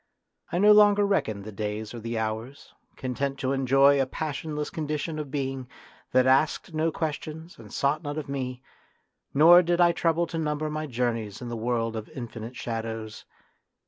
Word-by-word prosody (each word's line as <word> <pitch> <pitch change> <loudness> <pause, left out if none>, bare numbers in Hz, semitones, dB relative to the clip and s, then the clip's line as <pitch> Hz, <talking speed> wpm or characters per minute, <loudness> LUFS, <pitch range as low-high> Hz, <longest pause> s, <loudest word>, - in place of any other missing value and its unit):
I - - 0
no 205 +3 +6
longer 205 -1 +6
reckoned 110 - 0
the 110 - -8
days 105 +1 -4
or 120 - -6
the 115 +1 -4
hours, 110 +5 -4 0.2
content 135 +2 -3
to 130 -1 -1
enjoy 135 +1 +4
a 135 - 0
passionless 150 +1 -4
condition 155 0 -3
of 150 -2 -5
being 135 -2 -3 0.4
that 130 0 +4
asked 140 +6 +2
no 160 +1 +1
questions 160 +1 -5
and 110 -2 -12
sought 140 +5 0
none 145 -1 -5
of 155 - -4
me, 130 -2 -4 0.7
nor 170 +5 +8
did 175 0 0
I 175 -1 +6
trouble 170 0 +1
to 165 0 -4
number 150 0 -1
my 155 0 -3
journeys 115 -5 -2
in 125 - -6
the 120 - -4
world 115 0 -1
of 110 -1 -6
infinite 120 -4 -7
shadows. 115 -2 -5
135 Hz, 175 wpm, -27 LUFS, 115-155 Hz, 0.7 s, nor